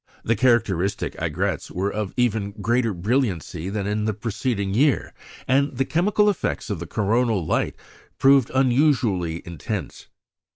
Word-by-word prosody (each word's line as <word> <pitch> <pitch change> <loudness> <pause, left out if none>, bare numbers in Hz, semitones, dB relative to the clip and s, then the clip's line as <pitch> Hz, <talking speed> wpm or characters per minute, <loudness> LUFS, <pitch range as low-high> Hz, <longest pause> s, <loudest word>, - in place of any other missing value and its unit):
The 115 - +1
characteristic 105 -7 +1
aigrettes 85 +2 -2
were 95 +3 -2
of 105 -2 -3
even 110 -5 0
greater 115 +3 0
brilliancy 95 - -1
than 100 -1 -3
in 105 +1 -1
the 110 -2 -1
preceding 110 -2 -2
year, 135 +4 +2 0.3
and 135 0 +2
the 135 - +1
chemical 205 +7 +2
effects 200 - -1
of 100 - -3
the 85 - -6
coronal 110 -2 +1
light - - 0 0.4
proved 135 -2 +5
unusually 120 - +2
intense. 85 - -6
110 Hz, 135 wpm, -23 LUFS, 95-125 Hz, 0.4 s, proved